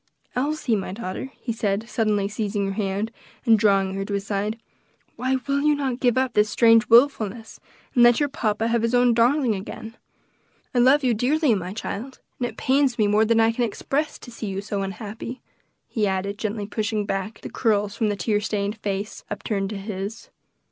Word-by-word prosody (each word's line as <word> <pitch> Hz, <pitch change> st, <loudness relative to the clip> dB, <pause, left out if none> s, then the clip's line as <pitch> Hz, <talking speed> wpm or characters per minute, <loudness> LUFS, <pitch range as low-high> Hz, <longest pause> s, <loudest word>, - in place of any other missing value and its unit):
"Elsie, 275 Hz, -2 st, 0 dB
my 195 Hz, -2 st, -3 dB
daughter," 200 Hz, +4 st, -5 dB
he 235 Hz, -, -3 dB
said, 215 Hz, 0 st, -1 dB
suddenly 215 Hz, -3 st, +1 dB
seizing 205 Hz, -1 st, -2 dB
her 195 Hz, -, -2 dB
hand, 200 Hz, +2 st, -2 dB, 0.3 s
and 225 Hz, -3 st, +5 dB
drawing 195 Hz, -2 st, +3 dB
her 195 Hz, 0 st, -2 dB
to 200 Hz, 0 st, -3 dB
his 200 Hz, 0 st, -3 dB
side, 210 Hz, +2 st, -2 dB, 0.6 s
"why 260 Hz, +1 st, 0 dB
will 280 Hz, 0 st, +1 dB
you 300 Hz, 0 st, +3 dB
not 265 Hz, -3 st, -2 dB
give 245 Hz, -2 st, +2 dB
up 260 Hz, -1 st, +1 dB
this 210 Hz, 0 st, +3 dB
strange 225 Hz, +3 st, +5 dB
wilfulness, 230 Hz, -3 st, +3 dB, 0.3 s
and 245 Hz, -, +3 dB
let 240 Hz, 0 st, +6 dB
your 290 Hz, -, +2 dB
papa 225 Hz, -5 st, -1 dB
have 235 Hz, -1 st, +2 dB
his 230 Hz, +2 st, +1 dB
own 245 Hz, -1 st, +4 dB
darling 245 Hz, +1 st, +3 dB
again? 215 Hz, +3 st, -7 dB, 0.8 s
I 245 Hz, -, +2 dB
love 265 Hz, +4 st, +5 dB
you 250 Hz, -2 st, +3 dB
dearly, 270 Hz, +4 st, +2 dB
my 185 Hz, -3 st, -3 dB
child, 225 Hz, +5 st, -6 dB, 0.2 s
and 245 Hz, -, 0 dB
it -, -, -10 dB
pains 265 Hz, -1 st, +2 dB
me 215 Hz, -, +3 dB
more 210 Hz, +2 st, +3 dB
than 230 Hz, +1 st, +3 dB
I 225 Hz, 0 st, +4 dB
can 240 Hz, +2 st, -1 dB
express 275 Hz, +6 st, -2 dB
to 245 Hz, -, -12 dB
see 230 Hz, -2 st, -6 dB
you 195 Hz, 0 st, -3 dB
so 200 Hz, 0 st, -3 dB
unhappy," 215 Hz, +5 st, -6 dB, 0.5 s
he 215 Hz, -3 st, 0 dB
added, 195 Hz, +2 st, -2 dB
gently 210 Hz, -1 st, -2 dB
pushing 215 Hz, 0 st, -2 dB
back 195 Hz, +2 st, -3 dB
the -, -, -8 dB
curls 210 Hz, -3 st, +1 dB
from 220 Hz, -, 0 dB
the 205 Hz, -, +1 dB
little 190 Hz, -, -6 dB
tear 210 Hz, -2 st, +2 dB
stained 205 Hz, 0 st, -2 dB
face 200 Hz, 0 st, -4 dB
upturned 205 Hz, -2 st, -2 dB
to 210 Hz, -, -5 dB
his. 200 Hz, +2 st, -6 dB
220 Hz, 200 wpm, -24 LUFS, 200-245 Hz, 0.8 s, let